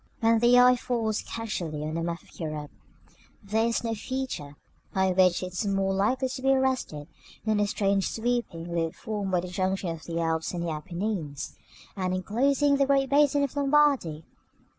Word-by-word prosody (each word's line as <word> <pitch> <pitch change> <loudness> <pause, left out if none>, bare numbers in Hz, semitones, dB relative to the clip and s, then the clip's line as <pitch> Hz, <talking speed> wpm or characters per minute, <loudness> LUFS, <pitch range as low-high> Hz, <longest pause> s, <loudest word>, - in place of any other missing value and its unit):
§ - - -37 0.2
III. 225 - +6
When 230 - +4
the 240 +2 +5
eye 250 0 +7
falls 225 -3 -1
casually 175 -10 -4
on 155 +1 -3
a 165 - -1
map 170 0 -3
of - - -19
Europe, 155 -3 -4 0.7
there 220 +3 +1
is 235 - -1
no 230 -1 -1
feature 225 - -4 0.4
by 190 0 +3
which 180 -1 +3
it 185 -1 -5
is 205 +3 -2
more 195 -1 +1
likely 255 +7 +1
to 260 0 -6
be 270 - +1
arrested 260 - 0 0.4
than 215 -1 +2
the 205 0 +2
strange 200 -1 +1
sweeping 220 -8 -2
loop 165 -1 -1
formed 210 -4 -4
by 180 -1 +2
the 180 - -6
junction 185 0 -1
of 165 -1 -8
the 170 0 -3
Alps 165 0 -1
and 170 0 -2
Apennines, 165 -1 -4 0.4
and 185 -2 -1
enclosing 275 +9 +2
the 275 -1 +2
great 275 -1 +2
basin 285 0 +4
of 280 - -2
Lombardy. 280 - +2
200 Hz, 185 wpm, -27 LUFS, 170-250 Hz, 0.7 s, eye